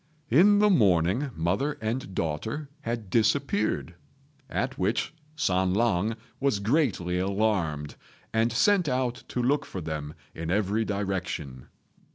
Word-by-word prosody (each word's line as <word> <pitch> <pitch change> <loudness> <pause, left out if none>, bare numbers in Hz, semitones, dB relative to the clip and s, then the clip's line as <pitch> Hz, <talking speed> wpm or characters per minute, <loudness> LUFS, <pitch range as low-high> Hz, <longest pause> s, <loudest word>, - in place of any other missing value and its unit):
In 195 - +6
the 210 0 +5
morning 100 - +3
mother 95 - 0
and 110 -5 -4
daughter 110 - -3
had 115 -6 -4
disappeared; 110 -5 +1 0.6
at 130 +1 -2
which 105 +10 0 0.2
San 95 -10 +1
lang 110 -1 +1 0.2
was 135 -5 +2
greatly 100 - +1
alarmed, 95 -7 0 0.4
and 115 +1 +2
sent 180 - +3
out 125 -1 -1
to 125 - -2
look 140 +4 +2
for 95 - -7
them 75 -2 -5 0.2
in 80 0 -5
every 105 +3 +1
direction. 90 -10 -3
105 Hz, 125 wpm, -27 LUFS, 90-130 Hz, 0.6 s, In